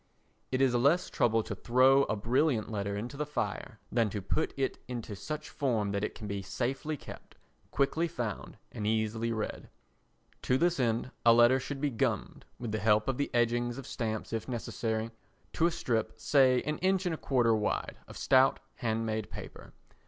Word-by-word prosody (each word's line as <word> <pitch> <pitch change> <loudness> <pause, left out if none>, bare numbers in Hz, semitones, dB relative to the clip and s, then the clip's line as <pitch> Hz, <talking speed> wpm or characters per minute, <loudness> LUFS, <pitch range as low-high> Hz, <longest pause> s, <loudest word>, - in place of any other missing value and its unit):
It 130 0 +1
is 130 -2 +4
less 140 +9 +3
trouble 115 -1 +2
to - - -5
throw 130 +3 +4
a - - -1
brilliant 115 +2 +1
letter 100 -1 -2
into 120 +6 -5
the 150 - -1
fire 150 - -3
than 115 -2 +2
to 100 - -3
put 100 - -1
it 135 -1 -1
into 120 -4 -5
such 150 +9 -5
form 115 -8 0
that 100 0 -1
it - - -3
can 110 - -8
be 100 -1 -3
safely 130 +10 -3
kept, - - -11 0.3
quickly 155 +5 +1
found 120 - -5
and 105 -1 -4
easily 110 +1 0
read. 110 -2 -4 0.7
To 130 - +2
this 175 +2 +2
end 120 0 0
a 115 - +7
letter 120 +3 +6
should 135 +2 -5
be 145 -1 +1
gummed, 115 - -2
with 120 -3 -5
the 110 - -1
help 105 0 +3
of 135 -2 0
the 145 - 0
edgings 120 0 +1
of 135 - -7
stamps 110 -4 -3
if 115 - -3
necessary, 115 -2 -2 0.4
to 165 - +3
a - - 0
strip, 115 -6 -2
say 130 0 +4
an 150 +1 -2
inch 190 0 +1
and 175 - 0
a - - -3
quarter 120 -4 +2
wide, 105 -1 -2
of - - -10
stout 130 0 +4 0.2
hand 115 -1 -1
made 110 -1 -2
paper. - - -9
120 Hz, 190 wpm, -31 LUFS, 110-135 Hz, 0.7 s, a